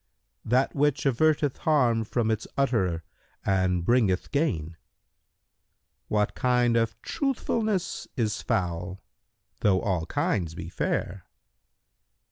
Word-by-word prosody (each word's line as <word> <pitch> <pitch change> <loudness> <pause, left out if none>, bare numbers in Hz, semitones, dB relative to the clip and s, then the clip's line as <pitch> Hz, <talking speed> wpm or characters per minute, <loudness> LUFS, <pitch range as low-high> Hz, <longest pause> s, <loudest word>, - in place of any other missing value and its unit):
"—"That 125 +4 +2
which 145 +1 +1
averteth 145 +1 +2
harm 125 -8 +2
from 115 0 0
its 110 0 -2
utterer 95 -12 +1 0.4
and 95 -2 +1
bringeth 110 -6 +2
gain." 140 - 0
Q - - -16 1.3
"What 105 -1 +1
kind 125 -2 +2
of 115 0 0
truthfulness 225 - -1
is 110 -4 0
foul, 90 +1 -2 0.6
though 95 -3 +3
all 90 -5 -1
kinds 85 -5 -1
are 85 -3 -6
fair?" 90 0 -2
115 Hz, 105 wpm, -27 LUFS, 95-135 Hz, 1.3 s, though